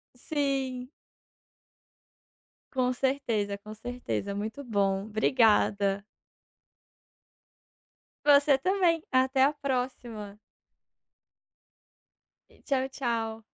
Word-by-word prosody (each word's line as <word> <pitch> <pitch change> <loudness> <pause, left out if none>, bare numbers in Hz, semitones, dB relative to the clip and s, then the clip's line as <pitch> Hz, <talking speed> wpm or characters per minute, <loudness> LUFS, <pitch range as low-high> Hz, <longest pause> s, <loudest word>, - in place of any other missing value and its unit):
Sim. 265 -2 -2 1.8
Com 255 -1 +1
certeza, 235 -7 -1
com 215 +2 -10
certeza. 225 -3 -4
Muito 220 +7 -5
bom. 200 -5 0
Obrigada. 210 -3 +2 2.2
Pra 290 -1 +8
você 285 -1 +3
também. 345 0 +2
Até 260 +1 +3
a 285 - +5
próxima! 245 -7 -4 2.3
Tchau, 265 -2 +1
tchau. 230 -4 -3
250 Hz, 70 wpm, -28 LUFS, 215-270 Hz, 2.3 s, Pra